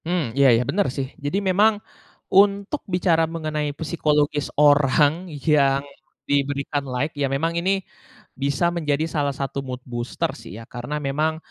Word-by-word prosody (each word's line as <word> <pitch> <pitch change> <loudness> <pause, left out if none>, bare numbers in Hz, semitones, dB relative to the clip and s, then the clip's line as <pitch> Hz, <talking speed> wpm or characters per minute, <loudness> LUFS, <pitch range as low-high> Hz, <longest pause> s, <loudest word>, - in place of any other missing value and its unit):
Mmm, 165 -9 -1
iya 140 -1 +6
ya, 120 - +1
bener 200 +1 +1
sih. 135 -1 -1 0.2
Jadi 145 +7 0
memang, 210 +3 +4 0.6
untuk 200 +7 +3
bicara 175 -2 +2
mengenai 155 -2 -2
psikologis 150 -2 0
orang 145 +3 +4
yang 140 -2 +2 0.5
diberikan 140 0 0
like, 130 +5 -2
ya 140 -1 +1
memang 155 +5 0
ini, 195 +2 0 0.5
bisa 140 +5 +1
menjadi 155 -2 0
salah 145 -3 -1
satu 140 0 -3
mood 125 0 -5
booster 120 -1 -3
sih, - - -11
ya. 115 - -10
Karena 125 +5 -5
memang, 150 +3 0
150 Hz, 145 wpm, -23 LUFS, 140-170 Hz, 0.6 s, iya